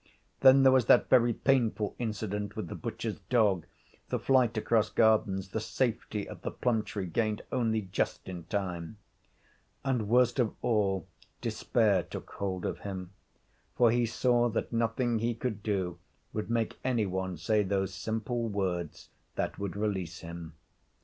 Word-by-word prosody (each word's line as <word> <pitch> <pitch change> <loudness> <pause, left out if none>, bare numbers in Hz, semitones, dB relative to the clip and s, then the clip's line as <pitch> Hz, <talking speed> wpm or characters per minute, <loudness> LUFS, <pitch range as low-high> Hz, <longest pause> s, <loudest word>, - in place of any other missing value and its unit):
Then 135 0 +7
there 130 - +7
was 130 -3 +4
that 120 - +5
very 120 -2 +6
painful 115 -4 +1
incident 105 -3 -3
with 110 - -4
the - - -5
butcher's 115 -2 -4
dog, 105 -9 +3 0.4
the - - 0
flight 125 -4 +3
across 110 0 +2
gardens, 105 -4 +2
the 110 - -2
safety 110 -2 -2
of - - -9
the - - -3
plum 120 -3 0
tree 100 -2 -5
gained 110 +4 -1
only 115 -4 +1
just 95 0 -2
in 90 -3 -6
time. 90 -1 -3 0.9
And, 125 -6 0
worst 125 +2 +4
of 115 -4 +1
all, 100 -5 +1 0.3
despair 105 -6 +2
took - - -8
hold 95 -2 -3
of - - -3
him, 95 -3 -6 0.7
for 120 -2 +5
he 120 0 +2
saw 120 +1 +2
that 115 - -3
nothing 115 0 +1
he 115 +1 0
could 115 -3 -3
do 95 -5 -2 0.3
would 110 +1 -3
make 115 -1 -1
any 120 -4 +1
one 95 -1 -3
say 105 +6 +2
those 95 -1 -1
simple 110 +4 -2
words 90 -5 -3 0.3
that - - -2
would 100 -2 -3
release 95 -5 -2
him. 85 -1 -8
110 Hz, 155 wpm, -30 LUFS, 95-120 Hz, 0.9 s, Then